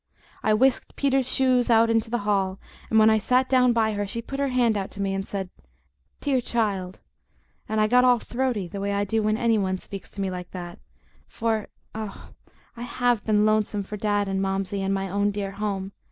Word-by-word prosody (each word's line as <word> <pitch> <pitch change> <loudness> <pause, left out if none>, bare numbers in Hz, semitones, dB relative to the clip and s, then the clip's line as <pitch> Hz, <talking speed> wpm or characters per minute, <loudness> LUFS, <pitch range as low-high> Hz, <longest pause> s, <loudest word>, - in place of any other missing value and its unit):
I 215 - +3
whisked 260 +3 +1
Peter's 270 -2 +2
shoes 255 -2 +2
out 230 0 +5
into 225 0 +1
the 240 - 0
hall, 195 -2 0 0.3
and 220 - +2
when 220 0 +7
I 220 - +3
sat 255 +4 +2
down 255 -2 +4
by 220 -2 +1
her 205 0 -2
she 230 +4 -2
put 275 +4 -6
her 280 - +1
hand 245 -4 +2
out 195 -2 -2
to - - -8
me 195 -1 0
and 195 0 -3
said, 190 -2 -4 0.7
"Dear 270 -3 +1
child," 200 -6 -2 0.7
and 220 0 0
I 215 - +4
got 250 +3 +4
all 250 -1 +5
throaty, 240 -5 -2
the 195 +3 -6
way 200 0 -1
I 200 0 +1
do 220 +2 0
when 215 0 +1
any 230 -2 +2
one 190 -1 0
speaks 195 +1 -10
like 185 -3 -3
that 175 -2 -6
to - - -15
me, - - -34
for, 225 -2 -2 0.3
oh, 215 -2 -7 0.4
I 235 - -9
HAVE 245 -2 0
been 210 -1 +3
lonesome 215 -1 +1
for 210 - -7
Dad 205 -1 0
and 195 0 -1
Momsey 195 0 -2
and 195 0 -1
my 195 0 -1
own 200 +2 +1
dear 200 -1 -3
home! 195 -1 -3
215 Hz, 215 wpm, -25 LUFS, 195-235 Hz, 0.7 s, when